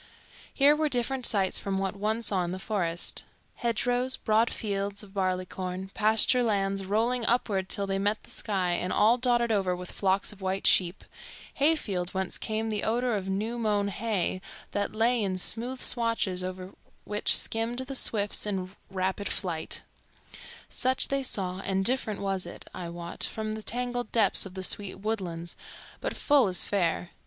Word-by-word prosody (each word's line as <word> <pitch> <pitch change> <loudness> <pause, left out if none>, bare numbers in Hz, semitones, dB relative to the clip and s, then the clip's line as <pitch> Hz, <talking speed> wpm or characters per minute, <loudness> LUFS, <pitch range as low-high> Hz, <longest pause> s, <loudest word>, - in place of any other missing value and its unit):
Here 285 +2 +5
were 305 0 +1
different 250 0 +1
sights 195 -4 +2
from 195 -1 -2
what 195 0 -1
one 215 +3 -1
saw 195 -4 +1
in 175 - -3
the - - -4
forest; 180 -4 -1 0.3
hedgerows, 245 +2 +2
broad 220 +1 +2
fields 200 -1 -3
of 195 -2 -14
barley 185 -2 0
corn, 185 +1 -5
pasture 220 +3 +4
lands 195 -4 +1
rolling 230 +5 +1
upward 200 -6 +1
till 200 - -1
they 195 0 -1
met 205 +2 0
the - - -9
sky 190 -4 0
and 180 +1 -1
all 230 +4 +4
dotted 240 -2 +2
over 190 -4 +1
with 180 0 -8
flocks 195 0 +1
of 205 - -17
white 190 +1 -2
sheep, 180 0 +4 0.5
hayfields 205 - +1
whence 190 -1 -1
came 220 0 -2
the 210 -1 -1
odor 240 +1 +1
of 195 -2 -3
new 220 +5 -2
mown 205 -3 +1
hay 200 -2 -1 0.3
that 205 +1 -2
lay 235 +2 +3
in 190 -2 -1
smooth 240 +7 -1
swathes 230 -8 0
over 185 0 -6 0.3
which 210 0 +2
skimmed 225 +2 -2
the 260 +1 -3
swifts 210 -5 0
in 190 -1 -3
rapid 190 +1 -2
flight; 165 -5 -2 0.8
such 260 +1 +1
they 275 0 +1
saw, 185 -7 0
and 195 0 -1
different 230 -4 +1
was 195 -2 -1
it, - - -10
I 175 -2 -5
wot, 170 0 -5
from 215 -1 -1
the 220 - -5
tangled 245 +1 -2
depths 205 -3 +4
of 185 - -13
the 190 - -4
sweet 200 +1 +1
woodlands, 185 -5 -3 0.4
but - - -3
full 285 -6 +4
as 180 -3 +1
fair. 175 -3 0
205 Hz, 170 wpm, -28 LUFS, 190-230 Hz, 0.8 s, Here